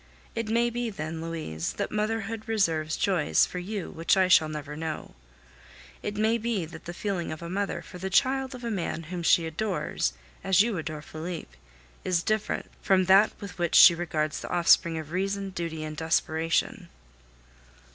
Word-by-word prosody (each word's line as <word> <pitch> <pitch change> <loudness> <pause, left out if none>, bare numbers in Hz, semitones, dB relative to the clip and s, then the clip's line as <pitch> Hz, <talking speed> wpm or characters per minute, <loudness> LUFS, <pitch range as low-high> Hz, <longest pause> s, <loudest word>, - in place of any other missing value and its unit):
It 230 -2 -3
may 235 +1 +2
be 240 0 -2
then, 160 -4 -5
Louise, 155 - -4
that - - -3
motherhood 220 +1 -2
reserves 165 -8 +1
joys 180 -6 +3
for 180 - -6
you 195 +1 -5
which 165 +4 +1
I 190 -1 +4
shall 160 -4 +5
never 150 -1 -6
know. 160 0 -5 0.9
It 205 0 -4
may 220 +2 +2
be 220 -6 -1
that 160 0 -11
the 175 - -6
feeling 190 -5 -2
of 155 +1 -7
a 170 - -6
mother 200 +1 -2
for 180 - -11
the 190 +2 -3
child 265 +5 +2
of 250 - -10
a 235 - -2
man 170 -4 -3
whom 175 - -3
she 170 0 +4
adores, 160 - -2 0.3
as 190 +1 +5
you 230 -2 -1
adore 155 -1 -5
Felipe, 160 - -7 0.5
is 175 -2 +1
different 215 -1 -1 0.2
from 190 -1 +3
that 195 +3 +6
with 200 -3 -9
which 170 -1 0
she 175 - +10
regards 160 -3 -2
the - - -7
offspring 170 -1 +4
of 155 -1 -7
reason, 195 +2 -2
duty, 165 -3 -4
and 155 -1 -6
desperation! 165 - 0
180 Hz, 175 wpm, -27 LUFS, 160-210 Hz, 0.9 s, she